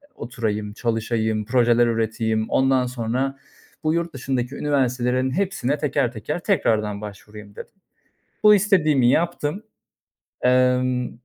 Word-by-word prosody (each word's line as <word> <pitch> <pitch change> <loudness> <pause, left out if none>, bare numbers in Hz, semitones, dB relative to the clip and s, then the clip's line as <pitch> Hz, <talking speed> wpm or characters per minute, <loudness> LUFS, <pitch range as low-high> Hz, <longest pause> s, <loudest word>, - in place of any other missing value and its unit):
oturayım, 110 -4 -4
çalışayım, 110 -1 -1
projeler 120 -1 +3
üreteyim. 110 -1 -1
Ondan 130 -1 +2
sonra 125 +3 -2 0.5
bu 155 0 +1
yurt 170 0 -2
dışındaki 130 0 -3
üniversitelerin 130 -3 0
hepsine 160 -6 -1
teker 140 -4 0
teker 125 +8 -4
tekrardan 110 - 0
başvurayım." 105 0 -11
dedim. - - -10 0.7
Bu 210 0 +8
istediğimi 160 - +3
yaptım, 170 +3 -1 0.8
emm, 125 0 +2
125 Hz, 105 wpm, -22 LUFS, 110-140 Hz, 0.8 s, Bu